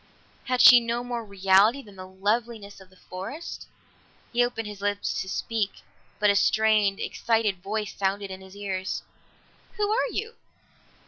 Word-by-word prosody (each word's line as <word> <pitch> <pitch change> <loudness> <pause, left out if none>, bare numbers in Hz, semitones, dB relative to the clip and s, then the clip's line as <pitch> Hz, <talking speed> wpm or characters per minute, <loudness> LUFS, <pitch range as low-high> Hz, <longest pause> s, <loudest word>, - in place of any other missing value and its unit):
Had 255 -1 +1
she 245 - +10
no 235 +1 -2
more 240 -1 -4
reality 200 +5 +3
than 205 -2 -15
the 185 0 -9
loveliness 205 +2 -3
of 190 - -16
the 185 - -22
forest? 195 - -8 0.7
He 240 +1 +4
opened 240 -2 -3
his 205 -1 -9
lips 205 0 -1
to 190 - -6
speak, 215 0 -3 0.3
but 210 -1 +4
a - - 0
strained 215 -1 +3
excited 220 -5 0
voice 210 -1 -3
sounded 195 0 -2
in 190 0 -8
his 190 0 -14
ears. 190 -2 -3 0.7
"Who 415 0 0
are 470 +3 +1
you?" 450 +1 -4
205 Hz, 155 wpm, -26 LUFS, 195-235 Hz, 0.7 s, she